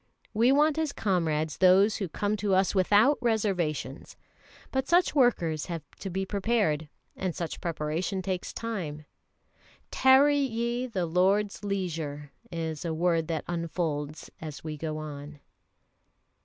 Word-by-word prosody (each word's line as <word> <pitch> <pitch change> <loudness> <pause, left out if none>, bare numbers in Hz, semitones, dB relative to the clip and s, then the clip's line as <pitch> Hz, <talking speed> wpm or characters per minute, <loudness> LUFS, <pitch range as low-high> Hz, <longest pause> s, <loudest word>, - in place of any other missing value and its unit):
We 235 +4 +4
want 300 +2 +3
as 310 -3 -1
comrades 160 -6 0
those 190 +3 +5
who 195 -5 -3
come 205 +5 -1
to 200 -1 +1
us 190 0 +2
without 205 +8 +4
reservations. 190 - -1 0.5
But 265 0 -1
such 350 +1 +3
workers 175 - +2
have 165 -4 -4 0.2
to 195 - -5
be 190 +2 -2
prepared, 195 -7 0 0.3
and 185 -3 -3
such 170 -3 -5
preparation 170 +3 -2
takes 185 -1 -3
time. 170 -10 -5 0.9
"Tarry 280 +2 +5
ye 240 -1 -1
the 190 -7 -2
Lord's 195 +5 +1
leisure," 160 -8 -3 0.2
is 160 -3 -4
a 165 -2 -2
word 165 -1 +1
that 160 -3 -3
unfolds 160 -3 -3
as 155 -3 -7
we 155 -1 -4
go 155 0 -4
on. 150 -1 -8
185 Hz, 135 wpm, -28 LUFS, 155-215 Hz, 0.9 s, those